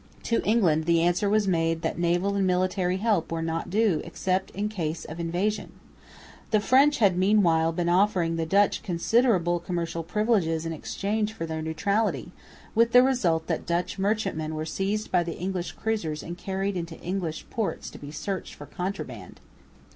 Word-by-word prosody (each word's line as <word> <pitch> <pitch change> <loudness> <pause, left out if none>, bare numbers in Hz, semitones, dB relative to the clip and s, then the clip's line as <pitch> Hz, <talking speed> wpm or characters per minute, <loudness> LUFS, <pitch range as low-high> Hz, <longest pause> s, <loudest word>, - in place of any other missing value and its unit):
To 230 - +1
England 180 -8 +2
the 170 0 +3
answer 175 +4 +2
was 210 -1 +2
made 165 -2 +1
that - - -2
naval 175 +3 +1
and 195 -1 +1
military 185 0 +1
help 200 -6 0
were 165 0 -2
not 165 0 -3
due 200 -5 +2
except 190 0 -1
in 205 +2 -3
case 170 -6 -3
of 160 +2 -8
invasion. 175 +6 -2 0.8
The 215 - +3
French 270 +7 +4
had 200 -6 +4
meanwhile 180 -4 +3
been 170 +1 -2
offering 175 -2 +2
the 165 -1 -2
Dutch 200 +3 +3
considerable 180 -1 +2
commercial 170 -1 -3
privileges 170 -4 0
in 165 - -2
exchange 210 +7 -2
for 165 - -4
their 160 -1 -4
neutrality, 200 +7 -1 0.4
with 230 +1 +3
the 250 0 +8
result 185 -12 +1
that 165 -2 -3
Dutch 175 +3 -1
merchantmen 195 -6 -1
were 155 0 -3
seized 195 +6 -2
by 180 - +4
the 170 -1 -4
English 185 0 -3
cruisers 175 -9 -2
and 170 - -6
carried 195 +2 -3
into 170 -2 -5
English 175 -3 -3
ports 220 -3 -3
to - - -11
be 145 - -8
searched 160 +5 -5
for 145 - -10
contraband. 180 +7 -6
180 Hz, 170 wpm, -26 LUFS, 165-205 Hz, 0.8 s, the